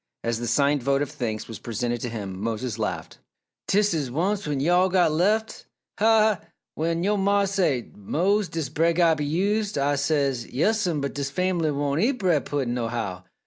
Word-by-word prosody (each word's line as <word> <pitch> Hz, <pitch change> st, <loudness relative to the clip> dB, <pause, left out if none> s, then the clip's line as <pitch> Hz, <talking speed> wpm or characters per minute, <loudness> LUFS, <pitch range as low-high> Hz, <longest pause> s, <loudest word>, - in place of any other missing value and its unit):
As 115 Hz, -1 st, -1 dB
the 120 Hz, -, -3 dB
signed 140 Hz, +4 st, +2 dB
vote 140 Hz, +3 st, +1 dB
of 145 Hz, -, -6 dB
thanks 110 Hz, -4 st, -4 dB
was 115 Hz, -, -8 dB
presented 120 Hz, +1 st, -3 dB
to 120 Hz, -, -3 dB
him, 100 Hz, -4 st, -6 dB
Mose 115 Hz, +1 st, -3 dB
laughed. 105 Hz, -, -4 dB, 0.5 s
"Dis 205 Hz, -1 st, +3 dB
is 145 Hz, -5 st, -1 dB
once 190 Hz, +8 st, -1 dB
when 145 Hz, -2 st, -1 dB
yo' 170 Hz, +6 st, +3 dB
all 185 Hz, +1 st, +4 dB
get 180 Hz, -3 st, +3 dB
lef'! 200 Hz, +8 st, +2 dB
Ha, 220 Hz, -, -12 dB, 0.4 s
ha, 220 Hz, +1 st, +5 dB
ha! 215 Hz, -4 st, +2 dB, 0.3 s
When 165 Hz, +2 st, -1 dB
yo' 205 Hz, +2 st, +1 dB
mah 200 Hz, +1 st, +2 dB
say, 180 Hz, -, 0 dB
'Mose, 185 Hz, -, 0 dB
dis 160 Hz, -4 st, -3 dB
bread 165 Hz, +3 st, +1 dB
gotta 165 Hz, -2 st, +4 dB
be 150 Hz, -, -2 dB
used', 200 Hz, +6 st, 0 dB
Ah 140 Hz, +1 st, +2 dB
says, 140 Hz, -4 st, 0 dB
'Yes'm, 175 Hz, -, 0 dB
but 140 Hz, -, -3 dB
dis 140 Hz, -1 st, -3 dB
fam'bly 175 Hz, +1 st, 0 dB
won't 145 Hz, +1 st, 0 dB
eat 250 Hz, +6 st, +3 dB
bread 185 Hz, -, +1 dB
pudding, 135 Hz, -4 st, -2 dB
nohow! 115 Hz, -6 st, -3 dB
150 Hz, 195 wpm, -25 LUFS, 125-190 Hz, 0.5 s, ha